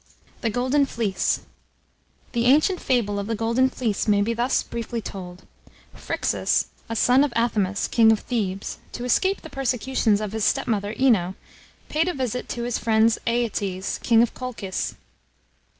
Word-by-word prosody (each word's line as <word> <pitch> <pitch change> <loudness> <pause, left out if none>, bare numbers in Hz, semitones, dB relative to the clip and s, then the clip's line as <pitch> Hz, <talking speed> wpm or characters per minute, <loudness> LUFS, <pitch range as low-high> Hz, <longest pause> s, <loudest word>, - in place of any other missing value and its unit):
THE 230 - 0
GOLDEN 255 +5 +1
FLEECE. 220 -6 0 0.9
The 235 -1 0
ancient 310 +8 +4
fable 210 -6 +1
of 200 - -4
the 225 - -1
Golden 230 +4 +2
Fleece 225 -6 -2
may 205 -1 +4
be 230 +3 0
thus 240 +3 +1
briefly 235 0 -4
told: 185 -4 -8 0.5
Phryxus, - - 0 0.2
a 230 - -3
son 250 +5 +4
of 290 - 0
Athamus, 205 -4 +1
king 225 -1 +5
of 220 - +1
Thebes, 200 -5 -3
to 245 - -5
escape 380 +10 +1
the 320 - -9
persecutions 255 -5 +1
of 210 -2 -4
his 220 -1 -2
stepmother 215 -5 0
Ino, 200 -9 +3 0.5
paid 320 +3 +1
a 360 - -1
visit 250 -2 -3
to 240 - -3
his 240 0 -1
friend 220 0 +3
Aeetes, 205 -5 -1
king 230 -1 +5
of 240 - -1
Colchis. 230 -7 -4
230 Hz, 155 wpm, -24 LUFS, 205-255 Hz, 0.9 s, king